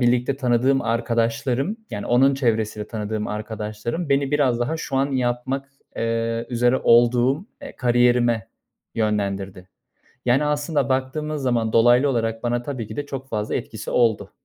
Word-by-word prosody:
birlikte 125 +2 +2
tanıdığım 130 +1 +2
arkadaşlarım. 120 - 0
Yani 105 -1 -5
onun 135 +3 +4
çevresinde 110 -5 -1
tanıdığım 105 -1 -3
arkadaşlarım 110 +7 -4
beni 140 0 +1
biraz 130 -5 +2
daha 145 +7 -1
şu 140 -4 -4
an 135 +1 +1
yapmak, 130 +2 -1 0.3
eee, 115 0 -1
üzere 120 +1 +2
olduğum, 120 - +4 0.2
eee, 275 - -9
kariyerime 120 -2 +2 0.5
yönlendirdi. 100 -3 -2 0.6
Yani, 130 +4 +3
aslında 150 +1 0
baktığımız 140 +3 -2
zaman 115 -4 0
dolaylı 120 +4 +5
olarak 115 -2 -1
bana 120 0 -1
tabii 125 -5 -5
ki - - -9
de 145 0 -3
çok 135 -1 -6
fazla 105 -3 -2
etkisi - - -5
oldu. 115 -3 +1
120 Hz, 140 wpm, -22 LUFS, 115-135 Hz, 0.6 s, dolaylı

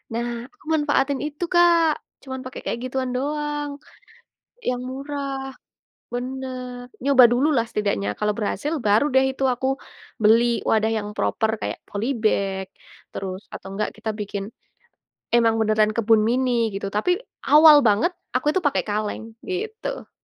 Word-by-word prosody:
Nah, 235 0 -3
aku 400 -2 -25
manfaatin 285 -3 +1
itu 300 +3 -5
Kak 340 -3 +4 0.2
cuman 260 -1 -6
pakai 255 - -7
kayak - - -2
gituan 255 0 -2
doang, 295 +2 -2 0.9
yang 250 - -2
murah 270 0 -5 0.6
bener, 250 -1 -5 0.2
nyoba 275 -3 +7
dululah 260 -1 +2
setidaknya 150 - -1
kalau 210 0 +1
berhasil 285 +8 -2
baru 210 +3 +3
deh 265 0 +5
itu 270 - -1
aku, 260 +2 -3 0.6
beli 225 +3 +6 0.2
wadah 220 0 +2
yang 210 -1 -5
proper 220 - +1
kayak - - -3
poly 235 +6 -2
bag, 195 -3 0 0.5
terus 190 0 -5
atau 190 - -8
enggak 210 +1 -1
kita 220 0 -3
bikin, 205 -1 -4 0.9
emang 230 -1 +4
beneran 215 0 +3
kebun 225 -1 +4
mini 240 -2 +1
gitu 195 0 -3
tapi 210 - 0 0.4
awal 305 0 +10
banget 210 +10 +3 0.2
aku 255 - 0
itu 375 - 0
pakai 285 - +2
kaleng 210 +1 -2 0.2
gitu. 440 +6 -4
250 Hz, 140 wpm, -23 LUFS, 215-285 Hz, 0.9 s, awal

